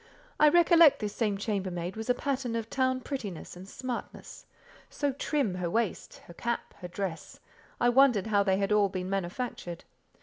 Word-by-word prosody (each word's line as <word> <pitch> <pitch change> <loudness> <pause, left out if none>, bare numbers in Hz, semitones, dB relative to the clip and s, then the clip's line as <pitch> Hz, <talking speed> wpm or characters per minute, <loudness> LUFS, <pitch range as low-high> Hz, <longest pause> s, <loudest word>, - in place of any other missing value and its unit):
I 300 - +7
recollect 335 -2 +6
this 210 -2 -3
same 210 -4 0
chambermaid 190 -4 -3
was 220 +2 -6
a 250 - +4
pattern 260 -3 -2
of 230 -1 -4
town 260 -1 +1
prettiness 220 - -6
and 185 +2 -11
smartness. 255 +1 -7 0.4
So 285 -1 -1
trim 275 -6 -1
her 180 -1 -2
waist, 225 +1 -2
her 170 - -12
cap, 235 +6 -3
her 180 - -6
dress—I 190 +6 -4
wondered 245 -5 +4
how 210 -2 +2
they 190 -1 +2
had 200 +1 -1
all 210 -1 +4
been 185 0 -4
manufactured. 190 -2 -4
215 Hz, 165 wpm, -29 LUFS, 190-255 Hz, 0.4 s, I